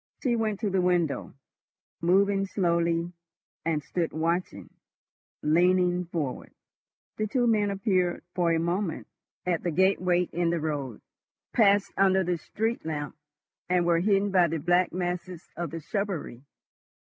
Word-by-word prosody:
She 245 Hz, -4 st, +2 dB
went 220 Hz, -3 st, -1 dB
to 210 Hz, -3 st, 0 dB
the 190 Hz, -1 st, +2 dB
window, 175 Hz, -5 st, 0 dB, 0.7 s
moving 195 Hz, +3 st, +3 dB
slowly, 170 Hz, -2 st, 0 dB, 0.5 s
and 155 Hz, -2 st, -1 dB
stood 170 Hz, +2 st, -2 dB
watching—leaning 175 Hz, +1 st, -1 dB
forward. 160 Hz, -6 st, -4 dB, 0.7 s
The 215 Hz, -, -1 dB
two 245 Hz, +3 st, +1 dB
men 215 Hz, -3 st, +2 dB
appeared 190 Hz, -3 st, 0 dB
for 175 Hz, -2 st, +1 dB
a 165 Hz, -, +2 dB
moment 170 Hz, +1 st, -2 dB, 0.4 s
at 175 Hz, -2 st, 0 dB
the 175 Hz, -, -1 dB
gateway 180 Hz, 0 st, +2 dB
in 175 Hz, -1 st, -1 dB
the 170 Hz, 0 st, 0 dB
road, 145 Hz, -7 st, -4 dB, 0.5 s
passed 205 Hz, -3 st, +3 dB
under 190 Hz, 0 st, +4 dB
the 175 Hz, -1 st, -1 dB
street 225 Hz, +7 st, -2 dB
lamp, 150 Hz, -2 st, -4 dB, 0.5 s
and 180 Hz, -1 st, +2 dB
were 170 Hz, -1 st, +3 dB
hidden 200 Hz, +2 st, +2 dB
by 180 Hz, -2 st, +4 dB
the 165 Hz, 0 st, -2 dB
black 175 Hz, +3 st, +2 dB
masses 180 Hz, 0 st, -4 dB
of 170 Hz, 0 st, -3 dB
the 165 Hz, -, -6 dB
shrubbery. 185 Hz, -, -3 dB
180 Hz, 135 wpm, -27 LUFS, 165-195 Hz, 0.7 s, under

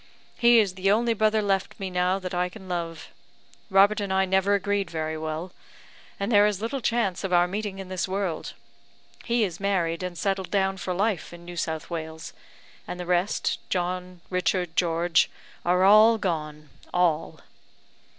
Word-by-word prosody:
he 235 Hz, 0 st, +6 dB
is 205 Hz, -4 st, +3 dB
the 190 Hz, +1 st, 0 dB
only 230 Hz, +3 st, +3 dB
brother 215 Hz, 0 st, +2 dB
left 195 Hz, 0 st, -1 dB
me 190 Hz, -1 st, -4 dB
now 180 Hz, +1 st, +1 dB
that 185 Hz, -2 st, -6 dB
I 180 Hz, 0 st, 0 dB
can 190 Hz, +1 st, -12 dB
love. 170 Hz, -2 st, -4 dB, 0.6 s
Robert 200 Hz, +2 st, +5 dB
and 200 Hz, -1 st, -3 dB
I 190 Hz, 0 st, +3 dB
never 190 Hz, +2 st, +2 dB
agreed 200 Hz, -2 st, -1 dB
very 160 Hz, -1 st, -3 dB
well, 160 Hz, +3 st, -4 dB, 0.7 s
and 200 Hz, +3 st, -2 dB
there 205 Hz, -1 st, +6 dB
is 205 Hz, -3 st, -1 dB
little 235 Hz, +5 st, -3 dB
chance 225 Hz, -6 st, 0 dB
of 195 Hz, -, -3 dB
our 175 Hz, 0 st, +4 dB
meeting 205 Hz, +1 st, -4 dB
in 195 Hz, -1 st, -7 dB
this 185 Hz, -1 st, -2 dB
world. 190 Hz, -4 st, -3 dB, 0.7 s
He 235 Hz, -1 st, +2 dB
is 175 Hz, -4 st, -3 dB
married, 180 Hz, -4 st, 0 dB
and 180 Hz, -1 st, -5 dB
settled 195 Hz, 0 st, -1 dB
down 195 Hz, -1 st, +1 dB
for 185 Hz, -1 st, -3 dB
life 200 Hz, -2 st, -1 dB
in 170 Hz, 0 st, -12 dB
New 175 Hz, 0 st, -8 dB
South 160 Hz, -1 st, -3 dB
Wales; 160 Hz, -1 st, -6 dB, 0.5 s
and 180 Hz, -, -6 dB
the 180 Hz, -, -4 dB
rest 180 Hz, +3 st, 0 dB
John, 180 Hz, 0 st, -3 dB
Richard, 180 Hz, -2 st, 0 dB
George, 170 Hz, -1 st, +2 dB, 0.3 s
are 180 Hz, +1 st, +2 dB
all 215 Hz, +3 st, +7 dB
gone 155 Hz, -6 st, -3 dB, 0.2 s
all!" 165 Hz, -3 st, 0 dB
185 Hz, 170 wpm, -26 LUFS, 175-200 Hz, 0.7 s, all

